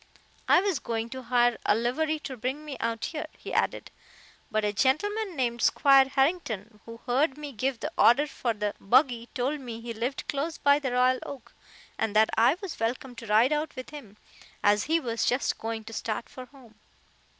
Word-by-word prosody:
"I - - +6
was 385 -8 0
going 230 0 -3
to 260 +2 -7
hire 240 -1 +2
a - - +3
livery 295 +8 0
to 270 - -6
bring 260 +6 -4
me 290 -3 -6
out 230 -1 -2
here," 310 -2 -5
he - - -8
added, - - -1 0.6
"but 215 -3 0
a 205 - 0
gentleman 380 - 0
named 240 -3 -1
Squire 275 -1 +5
Harrington, 255 - -1
who 230 0 -10
heard 265 +3 +1
me 295 -1 -7
give 255 +1 -2
the 305 - -3
order 265 +6 +6
for 245 -5 -3
the 210 -1 -2
buggy, 245 +1 +2
told 270 +4 -1
me 235 -4 -7
he 230 0 -6
lived 240 +5 -3
close 305 +4 -2
by 285 0 +4
the 265 -4 -3
Royal 255 +1 +3
Oak, 275 -3 -9 0.5
and 215 -1 -1
that 220 +1 +5
I 235 +8 +4
was 375 - -6
welcome 245 +3 -2
to 230 - -8
ride 225 +7 +4
out 300 0 -2
with 255 +2 -8
him, 230 -9 -11 0.5
as 205 0 +3
he 325 +2 +2
was 235 -6 -2
just 250 +2 0
going 225 0 -4
to 225 +1 -10
start 220 +1 -3
for 255 - -9
home. 255 -5 -18
250 Hz, 195 wpm, -27 LUFS, 230-285 Hz, 0.6 s, I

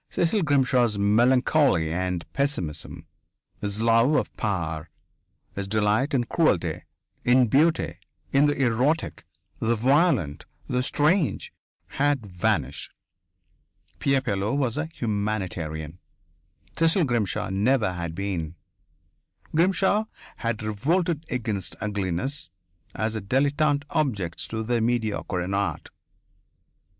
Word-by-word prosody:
Cecil 175 +5 +1
Grimshaw's 130 - +2
melancholy 120 - +3
and 90 -1 -2
pessimism, 85 - -2 0.5
his 105 0 -3
love 115 +5 +4
of - - -1
power, 85 -7 -2 0.6
his 100 0 -4
delight 110 +7 +1
in 125 - +2
cruelty, 95 - 0 0.4
in 125 +1 +5
beauty, 155 +8 +2 0.3
in 140 +2 +5
the 145 -1 0
erotic, 130 +7 0 0.3
the 115 +1 +1
violent, 125 - +2 0.2
the 125 0 0
strange, 150 +5 +1 0.3
had 145 -4 0
vanished! 90 -7 -1 1.1
Pierre 135 +5 +2
Pilleux 105 -1 -1
was 130 -5 0
a 155 +2 -2
humanitarian. 95 - -3 0.8
Cecil 165 +2 +3
Grimshaw 115 - -1
never 105 0 +2
had 85 -2 -5
been. 90 -4 -3 1.0
Grimshaw 190 +5 +3 0.3
had 115 -2 -2
revolted 160 - 0
against 110 -6 -3
ugliness 100 - -2 0.5
as 110 0 -1
a 110 - -3
dilettante 145 +6 +1
objects 105 - -1
to 110 0 -3
the 120 +1 0
mediocre 110 -6 -1
in 95 +2 -3
art. 100 0 -2
115 Hz, 105 wpm, -25 LUFS, 95-140 Hz, 1.1 s, in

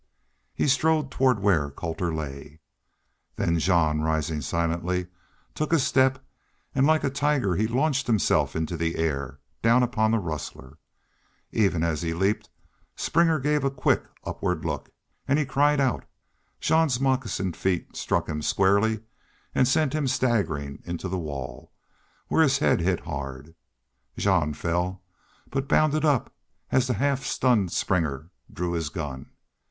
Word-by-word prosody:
He - - +1
strode 155 0 +2
toward 125 -5 +2
where 85 -8 +2
Colter 85 +4 -3
lay. 75 -1 -6 0.8
Then 85 0 +1
Jean, 80 -3 +2
rising 80 0 -1
silently, 85 +4 -1 0.5
took 155 +1 -2
a 165 - +5
step 130 -1 +3 0.6
and 135 +1 +3
like 155 0 +3
a 140 - 0
tiger 140 -8 +1
he 110 +4 +1
launched 135 +3 0
himself 110 -7 +2
into 80 +2 -2
the 85 0 -1
air, 70 -3 -2 0.2
down 120 +2 +4
upon 110 -2 +1
the 115 - +3
rustler. 75 -5 -6 0.7
Even 95 -7 +2
as 80 -3 0
he 80 -1 -2
leaped 95 +4 0 0.5
Springer 165 -1 +2
gave 150 +2 +1
a 135 - +2
quick, 135 - +1 0.2
upward - - -2
look. - - -3 0.4
And 140 - +3
he 155 - +1
cried 145 +2 +2
out. 135 -3 0 0.5
Jean's 160 -6 +2
moccasined 125 -9 0
feet 95 -2 -2
struck - - -1
him 75 0 -3
squarely 100 +6 +2 0.5
and 130 - +3
sent 135 +1 +2
him 155 -3 0
staggering 100 - 0
into 85 +2 -4
the 95 +1 -2
wall, 70 -6 -7 0.5
where - - +3
his 140 -3 +4
head - - +2
hit 90 +1 +1
hard. 70 +2 -6 0.6
Jean 85 -7 +2
fell, 90 +3 -2 0.5
but 135 0 -2
bounded 155 +1 +3
up 145 -6 +1 0.4
as 130 -1 +3
the 125 - 0
half 140 -1 0
stunned 110 -11 +2
Springer 80 -3 -1 0.2
drew 90 0 -3
his 85 -3 -2
gun. 70 -4 -6
95 Hz, 145 wpm, -26 LUFS, 80-135 Hz, 0.8 s, a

